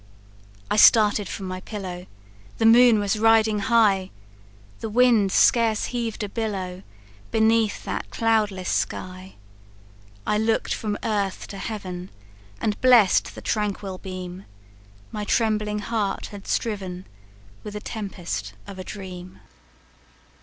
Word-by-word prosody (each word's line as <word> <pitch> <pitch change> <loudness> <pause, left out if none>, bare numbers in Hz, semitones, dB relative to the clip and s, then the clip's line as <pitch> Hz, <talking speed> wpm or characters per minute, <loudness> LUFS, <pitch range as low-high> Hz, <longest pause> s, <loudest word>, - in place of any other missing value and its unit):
"I - - +2
started 210 -2 +6
from 195 - -5
my 185 0 -5
pillow 185 -4 -7 0.5
The 225 - +1
moon 235 0 +7
was 205 0 0
riding 220 -1 +4
high, 200 -3 +3 0.7
The 225 - -4
wind 230 -4 +4
scarce 225 0 +3
heav'd 230 -3 -3
a - - -2
billow 195 -4 -4 0.5
Beneath 225 -1 +2
that - - -4
cloudless 210 -5 0
sky. 185 +1 -3 0.9
I 210 - +1
look'd 220 0 0
from 210 -2 -3
earth 200 -3 -2
to 200 - -7
heaven, 185 -4 -6 0.5
And 210 -1 -2
bless'd 245 -7 +5
the - - -9
tranquil 200 -3 -2
beam; 185 0 -7 0.7
My 210 - -4
trembling 210 -1 0
heart 210 -1 -2
had 200 -1 -10
striven 190 -5 -3 0.6
With 210 - -7
the - - -3
tempest 175 - -5
of 190 - -9
a - - -5
dream." 185 -2 -9
210 Hz, 125 wpm, -24 LUFS, 190-220 Hz, 0.9 s, moon